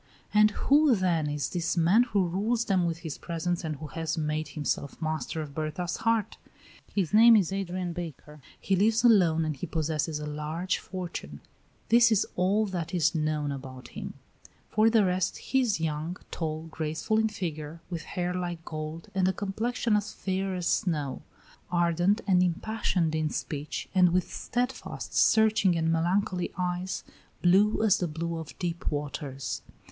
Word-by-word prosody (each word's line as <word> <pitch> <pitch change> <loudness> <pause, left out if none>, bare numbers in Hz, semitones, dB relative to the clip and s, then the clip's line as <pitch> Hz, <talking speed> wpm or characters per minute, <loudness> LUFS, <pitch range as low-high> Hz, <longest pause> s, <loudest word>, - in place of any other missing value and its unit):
And 210 0 +6
who, 285 +5 +4
then, 170 -6 +1
is 145 -2 -1
this 175 0 -2
man 175 +7 +5
who 200 -6 +1
rules 220 +6 0
them 185 -4 +2
with 165 -1 -2
his 155 - -5
presence 175 +2 -2
and 155 -2 -3
who 150 +2 -8
has 165 +2 -3
made 155 0 -1
himself 145 -2 -3
master 160 0 -2
of 145 -2 -10
Berta's 155 +3 -3
heart? 225 -1 0 0.5
His 195 -3 -1
name 230 +2 +8
is 195 -3 +2
Adrian 185 -2 -3
Baker, 155 -3 -8 0.2
he 195 - +1
lives 220 +4 +3
alone, 175 -9 +5
and 155 -1 -2
he 140 - -5
possesses 155 -1 -1
a 150 - -5
large 150 +5 -2
fortune. 170 - -6 0.5
This 235 0 +6
is 215 -2 +3
all 195 +4 +2
that 180 -3 -4
is 170 -1 +3
known 155 -2 -1
about 130 -2 -8
him. - - -7 0.6
For 215 +1 +4
the 220 -3 +4
rest, 180 0 0
he 265 - +1
is 225 -8 +1
young, 160 +2 -2
tall, 155 -1 -3
graceful 160 +8 -1
in 220 0 +2
figure, 160 -6 -5
with 170 -2 -3
hair 180 0 -3
like 175 -2 -4
gold 155 +1 -6
and 190 -1 +2
a 190 - +2
complexion 220 +3 -1
as 210 0 -1
fair 190 0 -2
as 180 -1 -3
snow; 150 -8 0 0.5
ardent 175 +4 +2
and 185 -3 +4
impassioned 180 -2 0
in 155 -1 0
speech, 150 0 -4
and 180 -2 +5
with 180 0 0
steadfast, 250 +2 -3
searching, 215 -5 +4
and 165 0 +1
melancholy 180 +2 0
eyes, 180 0 -2 0.4
blue 200 +5 +4
as 210 -2 +4
the 180 - 0
blue 165 +1 -3
of 160 - -9
deep 170 -2 -2
waters. 140 -2 -4
175 Hz, 165 wpm, -28 LUFS, 155-195 Hz, 0.6 s, name